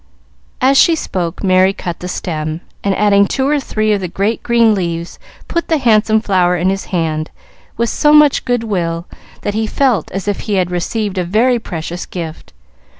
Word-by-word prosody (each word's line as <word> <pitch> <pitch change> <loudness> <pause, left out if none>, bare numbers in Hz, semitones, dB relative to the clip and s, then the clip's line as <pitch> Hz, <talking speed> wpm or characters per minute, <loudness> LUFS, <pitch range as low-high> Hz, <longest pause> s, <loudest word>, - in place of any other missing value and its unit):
As 270 +2 +4
she 335 - +5
spoke, 175 - -4
Merry 185 0 +4
cut 175 -3 -6
the 180 - -6
stem, 155 -3 -4 0.2
and, 200 -1 +1
adding 200 -1 +4
two 265 +5 -1
or 295 0 +2
three 215 -5 0
of 200 - -1
the 185 - -2
great 200 +6 -1
green 235 -2 +3
leaves, 170 -3 -3 0.3
put 340 - -2
the 320 - +2
handsome 220 -4 +3
flower 180 -4 +2
in 180 +2 +1
his 195 0 -3
hand 160 -3 -2 0.5
with 235 0 0
so 295 - +3
much 300 -2 +5
good 245 -2 0
will 170 -6 -2 0.4
that 205 - -2
he 220 +1 -1
felt 255 -2 +1
as 195 +1 -5
if 205 - -1
he 210 - -2
had 180 -2 0
received 195 +2 -2
a - - 0
very 230 +7 +2
precious 175 -3 -6
gift. 165 -3 -7
200 Hz, 190 wpm, -16 LUFS, 175-230 Hz, 0.5 s, she